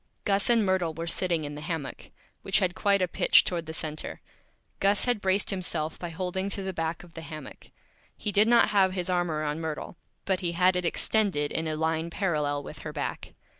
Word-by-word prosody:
Gus 200 +1 +2
and 230 -3 +5
Myrtle 180 -4 0
were 165 +1 -4
sitting 170 -1 0
in 145 0 -5
the 150 - -7
Hammock, 155 -4 -5 0.3
which - - +1
had 180 -2 +1
quite 200 0 +2
a - - +2
Pitch - - +5
toward 170 -3 -3
the - - -4
Center. 155 -1 -4 0.6
Gus 200 +1 +3
had 245 -4 +1
braced 190 +1 +1
himself 170 -5 -1
by 175 - -4
Holding 185 +3 -2
to 200 0 -3
the 190 0 -3
back 165 0 -3
of 175 -1 -16
the 165 - -7
Hammock. 155 -4 -10 0.5
He 210 - -2
did 205 +2 +5
not 235 0 +6
have 190 -2 +3
his 185 -1 -1
Arm 175 -1 +1
around 155 0 -2
Myrtle, 160 +1 -5 0.3
but 190 -2 +1
he 170 -2 -2
had 180 +1 +3
it 180 -1 -1
Extended 180 -5 +2
in 160 0 -2
a 155 - -1
Line 160 +1 -1
parallel 150 -6 -1
with - - -9
her - - -6
Back. - - -5
175 Hz, 210 wpm, -28 LUFS, 160-190 Hz, 0.6 s, not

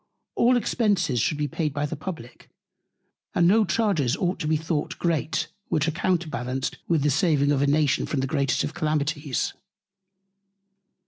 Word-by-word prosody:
All 245 +1 +4
Expences 200 - +1
should 150 +5 0
be 150 0 -1
paid 150 0 -2
by 145 0 0
the 150 - -4
Publick, 140 -7 -8 0.9
and 170 - +4
no 215 +4 +5
Charges 185 - +1
ought 180 0 -1
to 150 - -2
be 155 0 +2
thought 160 -1 -3
great, 160 -2 0 0.2
which 155 +1 +1
are - - +2
counterbalanced 150 -7 -2
with 160 -4 +2
the 150 - +3
saving 145 -3 +2
a 140 0 +2
Nation 145 -1 +2
from 145 - -1
the 135 - 0
greatest 135 -2 0
of 150 - -3
Calamities. 150 -3 -1
155 Hz, 155 wpm, -25 LUFS, 140-175 Hz, 0.9 s, no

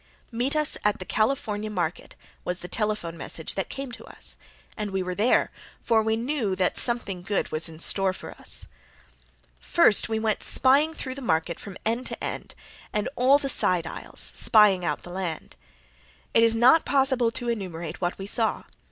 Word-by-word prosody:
"Meet 245 +5 -1
us 300 -1 0
at 210 -1 +2
the 185 - -7
California 215 -2 -1
market," 175 -5 -4 0.3
was 180 0 -3
the 180 - -7
telephone 210 -4 -2
message 160 -1 -4
that 195 - -3
came 275 -2 -6
to 235 - -10
us, - - -4 0.4
and 210 -2 -4
we 190 -1 -2
were 180 0 -4
there, 215 +7 +2 0.3
for 225 -2 +3
we 220 0 0
knew 235 -4 -2
that 185 -1 0
something 220 -7 +1
good 195 +2 -2
was 155 +2 0
in 160 -1 -12
store 195 +2 +4
for 185 - -9
us. - - +1 0.9
First 65 - +3
we 220 - -1
went 220 -1 0
through 275 0 +2
the 275 - -9
market 165 -6 -1
from 195 -2 -9
end 230 +3 -1
to - - -7
end - - -5 0.4
and 210 +2 -1
all 260 +3 +5
the 285 - -3
side 180 -9 +3
aisles, - - -2
"spying 210 -5 +5
out - - -2
the 175 - -10
land." 180 -3 -5 0.8
It - - +5
is 230 0 +4
not 255 +8 +5
possible 265 -4 +2
to 240 +1 -4
enumerate 180 -8 -5
what 175 0 -2
we 195 - -7
saw. 220 +2 +1
210 Hz, 180 wpm, -25 LUFS, 185-240 Hz, 0.9 s, all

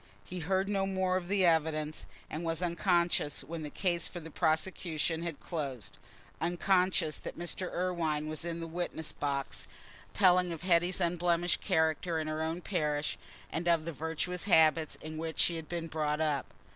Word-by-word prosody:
He 180 - -6
heard 190 +4 +1
no 195 -1 +1
more 190 -1 +1
of 180 -2 -1
the 195 -1 +3
evidence, 155 -2 +1 0.2
and 155 +2 -5
was 165 +1 0
unconscious 170 -4 +1
when 160 +4 -6
the 150 - -4
case 175 0 0
for 175 - -7
the 160 -1 -10
prosecution 160 0 0
had 170 -3 -4
closed—unconscious 165 - -1
that - - -7
Mr. 175 +2 -3
Irwine 165 -4 -1
was 155 0 -3
in 170 -1 -3
the - - -3
witness 165 -1 -3
box, 140 -1 -3 0.4
telling 180 -2 +4
of 165 0 -6
Hetty's 175 0 +3
unblemished 175 0 +1
character 160 +1 +1
in 155 - -2
her 155 0 -2
own 160 +2 -2
parish 150 -6 -1 0.3
and 170 +2 -2
of 165 -2 +3
the 170 - -3
virtuous 165 +4 -2
habits 160 -4 +5
in 155 0 -6
which 160 0 -4
she 170 - +3
had 160 -1 -8
been 170 -1 -3
brought 150 -1 -1
up. 150 -3 0
165 Hz, 170 wpm, -32 LUFS, 155-175 Hz, 0.4 s, habits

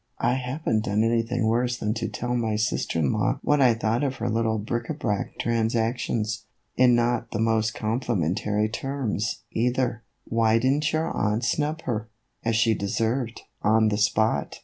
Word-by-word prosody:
" - - -48
I 125 - +1
have 130 +4 -4
n't 110 -1 +2
done 105 +1 +1
anything 115 +1 +1
worse 120 +2 +1
than 105 -1 -1
to 115 -1 -3
tell 120 +3 -3
my 110 -3 0
sister 105 -5 -1
in 75 -5 +2
law - - +1
what 145 -1 +3
I 125 -3 +5
thought 115 +3 0
of 135 -2 -1
her 120 -1 -2
little 110 0 +1
bric 120 +3 -3
a 155 - -2
brac 105 -9 -2
transactions, 115 -1 -1 0.3
in 125 -1 +5
not 120 0 +1
the 110 - -3
most 110 -1 +1
complimentary 105 -2 0
terms, 120 -3 -3
either. 125 0 0 0.2
Why 115 -1 +2
did 130 +3 +2
n't 150 +2 0
your 160 +1 0
aunt 110 +3 0
snub 150 +5 -1
her, 110 -2 -3 0.3
as 115 -1 +1
she 115 0 +4
deserved, 110 +4 -1 0.2
on 110 +1 +4
the 105 - 0
spot 110 +1 +1
115 Hz, 180 wpm, -25 LUFS, 110-125 Hz, 0.3 s, I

